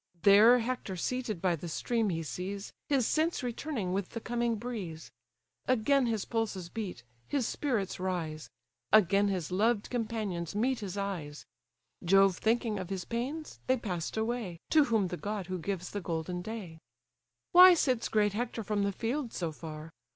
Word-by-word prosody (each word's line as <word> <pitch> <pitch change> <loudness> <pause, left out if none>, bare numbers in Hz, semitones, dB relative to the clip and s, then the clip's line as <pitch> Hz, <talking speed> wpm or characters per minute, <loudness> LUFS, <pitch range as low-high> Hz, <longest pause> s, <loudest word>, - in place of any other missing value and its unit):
There 210 +5 +8
Hector 240 -5 -3
seated 215 -1 -3
by 180 -2 +3
the 165 +2 -7
stream 225 +6 0
he 165 -2 -2
sees, 195 +5 -5 0.2
His 270 -5 +3
sense 315 +1 +1
returning 240 -6 -3
with 195 -1 -2
the 230 - -5
coming 235 0 -1
breeze; 205 -9 -6 0.6
Again 255 +2 +3
his 220 -3 -1
pulses 205 -6 -2
beat, 190 - -5 0.2
his 265 -5 0
spirits 225 -12 -1
rise; 170 -4 -3 0.4
Again 200 -1 +5
his 185 -4 -2
loved 210 +3 +1
companions 215 -8 -3
meet 245 +4 +1
his 200 -3 -5
eyes; 175 -7 -4 0.6
Jove 195 +1 +5
thinking 225 -2 +1
of 185 -1 -6
his 190 -2 -3
pains, 270 +7 -4
they 260 0 +3
pass'd 180 -5 -4
away, 220 -6 -2
To 305 -2 +6
whom 220 -7 +1
the 180 - -4
god 205 -1 -4
who 185 0 -4
gives 180 +1 -4
the 205 - -3
golden 170 +1 -3
day: 185 -5 -7 0.7
"Why 360 0 +10
sits 255 -7 +1
great 210 -2 +2
Hector 230 0 -3
from 210 0 -1
the 200 0 +1
field 240 +5 -3
so 170 -3 -2
far? 155 0 -8
205 Hz, 165 wpm, -31 LUFS, 180-235 Hz, 0.7 s, Why